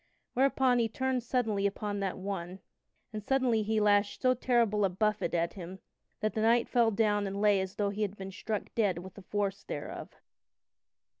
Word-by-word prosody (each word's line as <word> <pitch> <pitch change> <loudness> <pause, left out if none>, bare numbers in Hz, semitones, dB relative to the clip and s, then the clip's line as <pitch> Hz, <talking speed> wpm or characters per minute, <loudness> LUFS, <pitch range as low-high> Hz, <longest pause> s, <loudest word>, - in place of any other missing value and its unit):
Whereupon 260 -1 +3
he 230 -1 +1
turned 260 +2 -1
suddenly 225 -5 0
upon 205 0 -3
that 195 -2 -2
one, 185 -2 -5 0.6
and 215 -1 -5
suddenly 255 -3 +2
he 215 +1 0
lashed 205 -1 +2
so 255 0 +5
terrible 235 -4 +2
a 195 - +3
buffet 210 +1 0
at 170 0 0
him 185 0 -8 0.4
that 215 0 0
the 220 - -1
knight 230 +2 +3
fell 235 -2 +3
down 205 -1 +1
and 195 +1 -4
lay 205 -2 +4
as 190 0 -5
though 205 -1 0
he 205 +1 -5
had 205 -1 -2
been 195 0 -7
struck 210 +1 -4
dead 205 -6 +1
with 180 +1 -8
the 200 - -12
force 200 0 -2
thereof. - - -6
210 Hz, 190 wpm, -30 LUFS, 195-230 Hz, 0.6 s, so